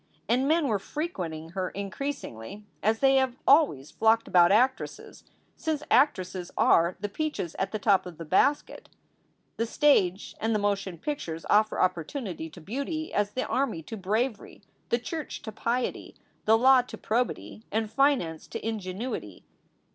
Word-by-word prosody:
And 255 +4 +2
men 315 -1 +3
were 215 -5 +1
frequenting 180 - -5
her 185 +1 -3
increasingly, 200 - -6 0.2
as 220 +2 +2
they 270 0 +5
have 260 -2 +1
always 270 - +4
flocked 225 +1 +2
about 175 0 +5
actresses, 255 +5 0 0.3
since 310 -2 -2
actresses 185 -10 +2
are 170 +2 +4
the 205 - -2
peaches 205 - -3
at 195 - -1
the 215 - -2
top 195 -3 +2
of 175 -3 -10
the 165 - -7
basket. 280 - +1 0.7
The 230 - 0
stage 205 - +2
and 225 0 +1
the - - +2
motion 200 -3 -1
pictures 165 - -5
offer 215 +1 +3
opportunity 180 - -2
to 160 - -13
beauty 280 - -4
as 205 0 0
the 255 - -1
army 250 -12 -1
to 225 - -7
bravery, 215 +2 -2 0.3
the 235 - +3
church 300 +5 -6
to 220 - -6
piety, 235 +3 -2 0.3
the 220 +1 +5
law 260 +2 +6
to 245 - -10
probity, 230 -1 -2
and 220 +1 0
finance 250 - +1
to - - -5
ingenuity. 200 - -5
220 Hz, 155 wpm, -27 LUFS, 185-265 Hz, 0.7 s, law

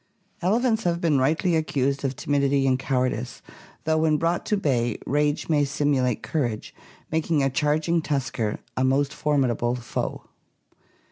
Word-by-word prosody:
Elephants 225 +4 +2
have 170 -1 0
been 160 -5 +2
rightly 160 +6 +2
accused 140 -3 0
of 135 -1 -1
timidity 140 -1 +1
and 130 -1 +2
cowardice, 125 -2 -2 0.4
though 160 0 +1
when 155 -1 +3
brought 165 +2 -1
to 210 - +2
bay 120 - 0
rage 145 +1 0
may 150 -3 +3
simulate 140 -4 0
courage, 120 -9 -2 0.4
making 160 -2 +1
a 135 - +1
charging 155 +5 +1
tusker 130 -8 -2 0.2
a 130 - 0
most 135 +2 +2
formidable 125 -5 +1
foe. 120 -1 -4
145 Hz, 140 wpm, -25 LUFS, 130-160 Hz, 0.4 s, when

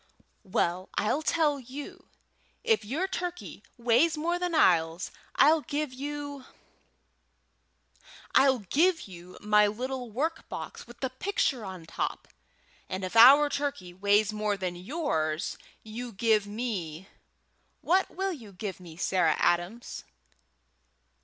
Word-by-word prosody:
"Well, 185 0 0
I'll 215 +8 +1
tell 305 -2 +1
you. 265 +3 -9 0.6
If 455 -2 +2
your 290 - -2
turkey 355 -2 -5 0.2
weighs 245 +7 +3
more 340 +3 -1
than 355 -2 -1
ours 165 - +3 0.2
I'll 310 +3 +5
give 290 -2 -3
you 285 0 -6 1.9
I'll 265 -1 +5
give 325 - +2
you 180 -1 -11
my 210 0 +4
little 250 +3 -4
work 310 +9 -3
box - - -7
with 240 0 -14
the 265 -2 -1
picture 265 - -1
on 190 -3 -7
the - - -14
top, - - -4 0.6
and 185 +1 -4
if 185 +4 -4
our 270 +6 +9
turkey 285 -11 -3
weighs 205 +2 +2
more 210 -1 -1
than 185 -2 -3
yours 175 - -2 0.3
you 235 +3 -7
give 215 0 +2
me 195 -7 -4 0.7
What 375 +3 +2
will 385 +1 -2
you 225 - -11
give 190 0 -6
me, 170 -3 -12
Sarah 175 -3 +2
Adams?" 175 +7 -1
235 Hz, 125 wpm, -28 LUFS, 190-290 Hz, 1.9 s, our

